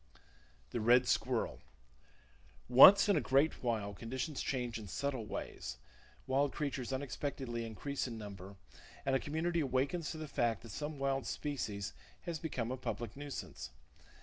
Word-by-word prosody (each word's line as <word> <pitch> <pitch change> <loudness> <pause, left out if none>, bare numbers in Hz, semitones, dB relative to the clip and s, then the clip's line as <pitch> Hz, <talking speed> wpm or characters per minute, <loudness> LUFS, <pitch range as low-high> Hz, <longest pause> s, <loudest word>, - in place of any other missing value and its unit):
The 120 - -2
Red 120 +3 +5
Squirrel. 120 -1 0 1.1
—Once 195 +12 +10
in 200 - +4
a - - +3
great 140 +4 +2
while, 110 -5 -1
conditions 130 +8 -4
change 125 -3 -2
in 105 - -8
subtle 130 +3 -2
ways, 65 -9 -5 0.5
wild 135 +1 +2
creatures 135 -4 -3
unexpectedly 130 -2 -3
increase 135 +6 -3
in 115 -2 -6
number, 100 -2 -8 0.5
and 135 - +2
a - - +3
community 165 +4 -1
awakens 140 +4 0
to - - -5
the 155 -1 -5
fact 115 -5 0
that 115 - -10
some 150 +6 -4
wild 135 -1 0
species 105 -9 -3 0.3
has 170 -3 -4
become 125 -7 -3
a 130 - -2
public 120 -3 -4
nuisance. 140 - -6
130 Hz, 150 wpm, -35 LUFS, 115-145 Hz, 1.1 s, Once